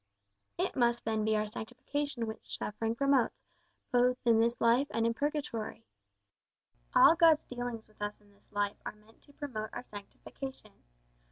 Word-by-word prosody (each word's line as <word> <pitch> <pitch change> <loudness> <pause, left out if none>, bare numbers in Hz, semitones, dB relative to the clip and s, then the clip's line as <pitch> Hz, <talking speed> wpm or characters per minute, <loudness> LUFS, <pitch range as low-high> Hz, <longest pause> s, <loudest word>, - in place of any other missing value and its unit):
"It - - -1
must 240 -2 +2
then 220 -1 0
be 215 0 +2
our 215 0 +1
sanctification 245 +4 -4
which 220 0 -7
suffering 225 +2 -2
promotes, 275 -1 +2 0.5
both 250 0 +4
in 230 -2 +5
this 235 +1 +2
life 240 +5 +4
and 230 0 0
in 230 - +2
purgatory." 235 -5 -3 1.1
"All - - +9
God's 325 -2 +6
dealings 245 -2 -5
with 215 -1 -23
us 210 0 -3
in 205 -1 -24
this 200 - -30
life 205 -1 -1
are - - -5
meant 215 +1 -23
to 285 - -19
promote 245 -8 -5
our - - -5
sanctification. 215 +3 -9
230 Hz, 160 wpm, -32 LUFS, 215-260 Hz, 1.1 s, All